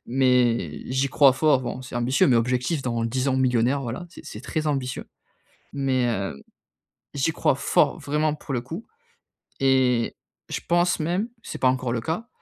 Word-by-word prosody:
mais 120 - +2
j'y 135 +1 +1
crois 140 0 +5
fort. 135 -1 +3
Bon 125 +1 -4
c'est 125 - -10
ambitieux, 125 +2 +2
mais 125 - +4
objectif 125 +6 0
dans 120 -2 -1
10 130 +4 -1
ans, 130 - +1
millionnaire, 130 +1 +2
voilà. 125 +8 -5
C'est - - -13
c'est 105 - -8
très 155 +3 -3
ambitieux, 135 -4 -2 0.7
mais, 130 -3 +1
heu, 95 -10 -3 0.7
j'y 140 +4 +1
crois 140 - +1
fort, - - +2
vraiment 150 +1 0
pour 145 -2 -7
le 120 - 0
coup 165 - -7 0.7
et 130 -3 +2 0.3
je - - -2
pense 175 0 +2
même 175 +8 -1 0.2
c'est - - -6
pas 130 - +3
encore 130 -1 0
le 115 -1 -1
cas, 175 - -3
130 Hz, 175 wpm, -24 LUFS, 120-145 Hz, 0.7 s, crois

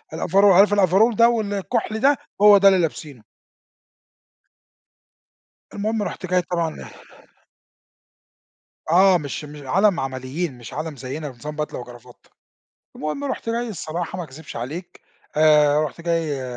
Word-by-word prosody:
الoverall 195 +5 +2
عارف 200 +2 +5
overall 205 +4 +3
ده 235 +2 +5
والكحل 220 0 -2
ده 275 +3 +3 0.2
هو 205 -1 +8
ده 195 0 +5
اللي 190 -2 +5
لابسينه. 145 -7 -5 2.5
المهم 215 +1 -2
رُحت 190 - -6
جاي 180 0 +1
طبعًا 170 -2 -4 2.1
آه 185 +1 +5
مش 150 0 -6
م 145 -2 -11
عالم 195 +5 +2
عمليين 135 +3 -4
مش 120 0 -11
عالم 155 +1 -5
زيّنا 140 +4 -6
نظام 145 +5 -9
بدلة 150 -3 -4
وكرافتة، 120 -1 -14 0.7
المهم 155 - -4
رُحت 265 -4 -4
جاي 235 +1 -2
الصراحة 175 -2 -5
ما 175 - -4
اكذبش 150 0 -11
عليك 150 +10 -7 0.4
آآ، 150 -1 +5
رُحت 150 +3 -7
جاي 165 -5 -2
170 Hz, 125 wpm, -22 LUFS, 145-200 Hz, 2.5 s, هو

